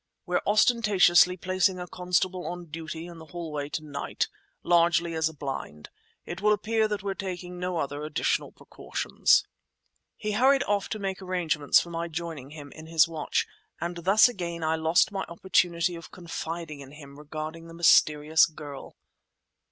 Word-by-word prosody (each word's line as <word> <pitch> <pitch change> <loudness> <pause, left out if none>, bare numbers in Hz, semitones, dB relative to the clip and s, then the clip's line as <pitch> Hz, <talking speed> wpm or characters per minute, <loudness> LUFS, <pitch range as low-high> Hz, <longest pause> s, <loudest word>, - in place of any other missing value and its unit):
We're 180 -1 0
ostentatiously 200 -5 +5
placing 185 +1 +1
a 180 - -4
constable 180 +1 -1
on 175 0 -6
duty 160 0 -7
in 170 -1 -10
the 160 - -12
hallway 155 -4 -5
to 160 0 -4
night—largely 170 +3 0
as 160 0 +1
a - - -11
blind. 135 - -6 0.3
It 175 +2 -6
will 210 0 +4
appear 220 +1 +1
that 210 -2 -3
we're 200 -1 -2
taking 180 -2 -6
no 180 -1 -2
other 145 -1 -3
additional 150 0 -1
precautions." - - 0 0.7
He 210 - -3
hurried 270 +6 +4
off 205 -4 -1
to 215 - -3
make 195 -2 -4
arrangements 175 -6 +2
for 170 - -6
my 170 0 -3
joining 160 -5 -6
him 145 -2 -10
in 155 0 -11
his 160 -1 +4
watch, 160 -3 -1 0.3
and 175 +1 -4
thus 195 +7 +5
again 170 -7 -5
I 160 0 +1
lost 160 +5 +3
my 195 -1 -3
opportunity 170 0 +1
of 165 -1 -9
confiding 165 -3 -6
in 140 0 -11
him 140 -1 -12
regarding 155 +2 -7
the 165 - -11
mysterious 155 -2 +5
girl. 150 -3 -10
170 Hz, 160 wpm, -27 LUFS, 155-185 Hz, 0.7 s, ostentatiously